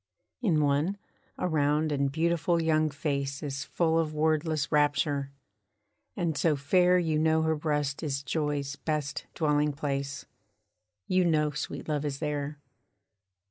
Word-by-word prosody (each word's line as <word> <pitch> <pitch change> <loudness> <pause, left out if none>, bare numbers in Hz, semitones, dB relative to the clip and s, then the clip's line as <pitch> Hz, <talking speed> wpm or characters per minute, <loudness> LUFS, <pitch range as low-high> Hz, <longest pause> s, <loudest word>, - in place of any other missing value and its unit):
In 170 -10 +2
one, 145 +7 +1 0.4
a - - -1
round 150 -1 +1
and 140 -1 +1
beautiful 170 +2 +1
young 155 -1 +2
face 140 -1 -3
Is 140 -1 -4
full 165 -1 +1
of 155 -2 -1
wordless 155 -1 +1
rapture; 145 -1 +1 0.8
and 170 -4 -1
so 155 +1 +2
fair 180 +6 +3
You 160 -3 +1
know 160 0 +3
her 160 0 +2
breast 150 -2 -1
is 140 -3 -2
joy's 145 -1 -2
best 150 -2 -3
dwelling 150 -2 +2
place; 140 -2 -3 0.8
You 185 0 +2
know 155 -3 +2
sweet 145 +1 -5
love 150 -2 -1
is 145 -2 -2
there. 150 -1 -3
150 Hz, 140 wpm, -29 LUFS, 145-160 Hz, 0.8 s, fair